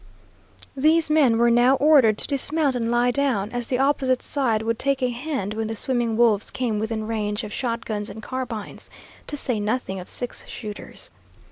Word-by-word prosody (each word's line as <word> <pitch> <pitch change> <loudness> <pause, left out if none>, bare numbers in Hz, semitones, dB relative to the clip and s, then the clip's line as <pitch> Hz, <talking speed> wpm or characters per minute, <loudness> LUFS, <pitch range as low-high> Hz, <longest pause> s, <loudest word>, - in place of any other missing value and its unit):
These 310 +3 +3
men 275 -7 +4
were 235 0 +4
now 245 +3 +5
ordered 270 -7 +5
to - - +1
dismount 285 +1 +1
and 235 -2 -1
lie 240 +1 +2
down, 245 -7 0
as 245 -1 -3
the 250 - 0
opposite 265 -1 +1
side 235 -6 0
would 230 0 -1
take 275 -1 0
a 250 - +2
hand 245 -5 -3
when 220 0 -3
the 225 - -4
swimming 235 -1 0
wolves 225 -4 +3
came 230 -5 -2
within 220 0 -3
range 215 0 -2
of 210 -1 -7
shotguns 230 -4 -3
and 220 - -9
carbines, 250 -5 -6 0.4
to 290 - -4
say 245 -5 0
nothing 210 -2 -2
of 180 - -9
six 245 - -5
shooters. 210 -3 -8
240 Hz, 180 wpm, -23 LUFS, 220-265 Hz, 0.4 s, now